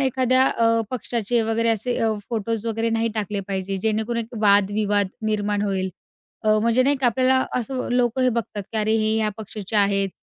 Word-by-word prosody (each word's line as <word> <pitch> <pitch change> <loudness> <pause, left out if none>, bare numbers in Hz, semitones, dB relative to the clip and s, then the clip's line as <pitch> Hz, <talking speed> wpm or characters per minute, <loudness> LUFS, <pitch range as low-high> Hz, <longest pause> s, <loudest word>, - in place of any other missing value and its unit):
एखाद्या 260 -1 +3
अ, 230 -2 +2
पक्षाचे 235 -1 -1
वगैरे 225 +1 +1
असे 225 +2 0
अ, 225 -1 +1 0.2
फोटोज 225 0 -2
वगैरे 225 0 -1
नाही 225 0 0
टाकले 210 -1 -2
पाहिजे, 195 0 -2
जेणेकरून 220 +2 0
एक 230 +2 -12
वादविवाद 205 0 +3 0.2
निर्माण 205 -1 0
होईल. 190 -2 -1 0.5
अ, 215 0 +4
म्हणजे 230 +3 +3
नाही 280 +2 +2
का 260 -2 +1
आपल्याला 260 +2 +2
असं 255 +2 -4
लोक 245 0 +1
हे 255 - +3
बघतात, 225 -3 -3
की - - -3
"अरे, 215 +1 +2
हे 215 0 +1
या 220 -1 +1
पक्षाचे 215 -1 -5
आहेत," 200 -1 +2
220 Hz, 180 wpm, -22 LUFS, 205-240 Hz, 0.5 s, अ